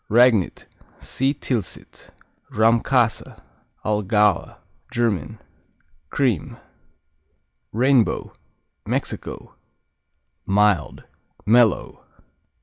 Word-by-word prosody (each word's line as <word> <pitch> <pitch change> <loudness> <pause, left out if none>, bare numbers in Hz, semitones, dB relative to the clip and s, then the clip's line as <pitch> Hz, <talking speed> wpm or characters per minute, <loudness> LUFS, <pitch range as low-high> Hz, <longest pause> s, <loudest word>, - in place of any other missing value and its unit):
Ragnit 115 -4 +3 0.3
see 135 +1 -1
Tilsit. 125 -7 -5 0.4
Rahmkäse, 115 +2 +1 0.5
Allgäuer 105 -2 +1 0.3
German 115 - -1 0.7
Cream. 125 - -1 1.1
Rainbow 125 +1 +2 0.5
Mexico - - -5 0.9
Mild; 100 -5 +1 0.4
mellow. 115 -1 +2
110 Hz, 50 wpm, -22 LUFS, 105-125 Hz, 1.1 s, Ragnit